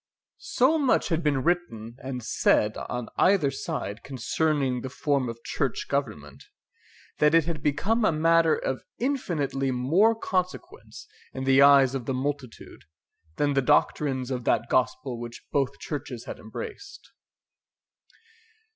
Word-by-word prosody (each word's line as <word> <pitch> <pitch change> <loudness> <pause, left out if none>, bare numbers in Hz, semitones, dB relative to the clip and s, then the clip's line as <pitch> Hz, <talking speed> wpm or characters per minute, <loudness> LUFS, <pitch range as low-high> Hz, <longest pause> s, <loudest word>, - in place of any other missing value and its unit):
So 320 -1 +2
much 265 -6 +2
had 165 -1 0
been 145 -4 0
written 120 -10 -2
and 130 -2 -5
said 105 -1 +2
on 125 -1 -5
either 185 -8 +3
side 135 -7 -5
concerning 135 0 -1
the 130 - -5
form 140 -2 -1
of 115 0 -8
church 135 -5 -2
government, 105 - -4 0.8
that 150 +2 +4
it 165 -2 +4
had 165 -2 -4
become 195 +11 0
a 210 - +4
matter 165 +1 +3
of 130 - -3 0.2
infinitely 165 - -1
more 160 - +3
consequence 225 - -4 0.3
in 130 - -5
the 135 +1 +4
eyes 140 -2 +6
of 130 -4 -4
the 135 - -1
multitude 135 -2 -5 0.5
than 145 -1 +1
the 135 - +2
doctrines 130 0 +1
of 125 -2 -3
that 115 - +1
gospel 130 -1 0
which 120 0 -9
both 140 -3 0
churches 135 -5 -6
had - - -7
embraced. 405 -4 -9
140 Hz, 140 wpm, -26 LUFS, 130-165 Hz, 0.8 s, eyes